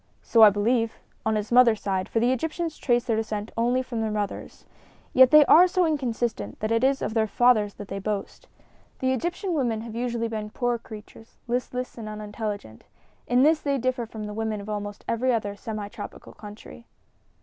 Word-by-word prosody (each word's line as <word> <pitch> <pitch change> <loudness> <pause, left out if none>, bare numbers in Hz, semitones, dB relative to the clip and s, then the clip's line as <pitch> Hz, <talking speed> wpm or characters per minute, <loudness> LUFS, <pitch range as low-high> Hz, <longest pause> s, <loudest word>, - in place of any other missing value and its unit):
"So 230 - +3
I 215 - +11
believe 225 +3 0 0.3
on 220 - +2
his 210 +1 -3
mother's 235 -3 +5
side, 190 -2 -2
for 225 - 0
the 240 +2 +2
Egyptians 320 +4 -2
trace 240 -2 +2
their 235 -3 0
descent 215 -1 -3
only 245 +3 +1
from 240 -3 -4
their 220 - -1
mothers. 210 -1 -5 0.5
Yet 260 0 +7
they 305 +1 +8
are 355 +6 +7
so 365 0 +1
inconsistent 240 - -2
that 215 +1 -2
it 230 +1 +2
is 270 +1 +2
of 215 - -2
their 220 -1 +1
fathers 215 -2 +3
they 195 -1 -6
boast. 205 0 -5 0.5
The 260 0 0
Egyptian 350 - -2
women 240 -8 0
have 230 -1 -8
usually 235 -1 -2
been 215 -2 -5
poor 240 +1 -1
creatures, 220 0 -13
listless 250 0 -3
and 215 -1 -6
unintelligent. 210 - -6 0.4
In 245 +1 +3
this 310 +1 +4
they 280 -2 -1
differ 250 -2 -1
from 220 -1 -8
the 210 0 -6
women 220 -1 -2
of 200 +1 -9
almost 205 -1 -5
every 250 +3 +1
other 205 -4 -1
semi 215 -1 -6
tropical 205 0 -10
country." 215 +3 -12
230 Hz, 190 wpm, -25 LUFS, 210-250 Hz, 0.5 s, I